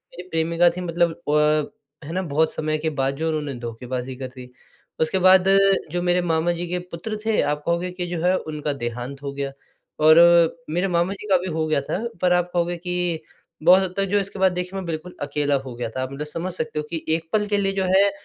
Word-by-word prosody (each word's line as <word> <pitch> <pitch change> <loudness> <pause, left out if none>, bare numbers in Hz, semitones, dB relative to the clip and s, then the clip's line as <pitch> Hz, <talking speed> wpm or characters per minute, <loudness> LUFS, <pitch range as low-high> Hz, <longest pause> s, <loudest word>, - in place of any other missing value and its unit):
मेरी 180 +1 -9
प्रेमिका 165 +1 +3
थी - - -3
मतलब 170 -1 +1 0.2
अ, 150 -1 0
है - - -6
ना 185 - 0
बहुत 160 -1 +1
समय 155 0 -1
के 160 +1 -1
बाद 135 +1 +1
जो 160 +2 -1
उन्होंने 150 -3 -2
धोखेबाज़ी 125 +2 -5
कर 130 0 -5
दी, 125 -1 -10 0.5
उसके 160 +4 +1
बाद 190 0 +7 0.4
जो 175 - -1
मेरे 180 0 +2
मामा-जी 170 +1 0
के 180 +1 -2
पुत्र 215 +6 -5
थे 220 -1 +2
आप 150 0 -1
कहोगे 170 +1 0
कि 180 -1 -4
जो 165 - -3
है 185 +1 +4
उनका 150 -3 -3
देहांत 125 +2 -5
हो 140 - -3
गया। 140 0 -3 0.5
और 155 +1 +8 0.5
मेरे 175 +4 0
मामा 175 +1 +1
जी 210 +1 -9
का 190 - +6
भी 180 +1 -5
हो 160 - +1
गया 155 -2 +2
था, 140 - -3 0.2
पर 180 -1 +4
आप 175 0 +1
कहोगे 175 0 0
कि 180 -2 -2 0.4
बहुत 185 +3 +7
हद 185 - -3
तक 195 - +2
जो 195 - -1
है - - +3
इसके 200 0 -7
बाद 190 -1 +4
देखिए 180 0 -4
मैं 190 -2 -4
बिल्कुल 165 +2 -5
अकेला 145 0 0
हो 130 - -7
गया 120 -1 -4
था 130 +3 -4
आप 130 - -5
मतलब 145 +2 -5
समझ 170 +4 -4
सकते 155 -3 -3
हो 150 - -2
कि 165 -2 -4
एक 160 0 0
पल 210 -1 +2
के 205 - +1
लिए 195 -1 +1
जो 195 -1 0
है 195 +2 +4
165 Hz, 235 wpm, -23 LUFS, 150-180 Hz, 0.5 s, और